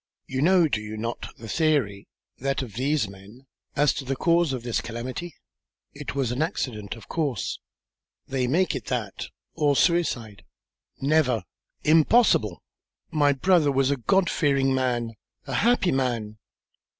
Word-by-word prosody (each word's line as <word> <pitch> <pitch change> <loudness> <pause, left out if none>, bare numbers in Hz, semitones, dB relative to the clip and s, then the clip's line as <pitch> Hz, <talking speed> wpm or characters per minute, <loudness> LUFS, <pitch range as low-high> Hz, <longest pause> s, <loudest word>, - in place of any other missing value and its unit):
You 130 0 -3
know, 175 +1 +5
do 110 -7 -1
you 105 0 -7
not, 115 +2 -4
the 115 - -10
theory, 130 -9 0 0.3
that 135 +1 -1
of 115 -5 -9
these 135 +1 0
men, 100 +7 -14 0.3
as 145 0 +3
to 140 - -5
the 135 +1 -2
cause 170 +1 +2
of 125 -3 -4
this 120 -2 -1
calamity?" 125 +9 -6 0.6
"It 145 0 -6
was 135 -4 0
an 125 +4 -2
accident, 110 - -3
of 115 - -13
course." 150 -7 -2 0.7
"They 130 -2 -1
make 175 +8 +2
it - - -5
that, 115 -6 -3 0.3
or 145 -3 +2
suicide." 125 - +1 0.6
"Never! 135 -7 +2 0.4
Impossible! 155 - +4 0.5
My 145 -2 +3
brother 155 +1 +3
was 135 0 +2
a 140 - +1
God 190 - +2
fearing 135 -4 +2
man, 120 -3 0 0.3
a - - -5
happy 230 -6 +3
man." 115 -5 -1
135 Hz, 150 wpm, -25 LUFS, 115-155 Hz, 0.7 s, know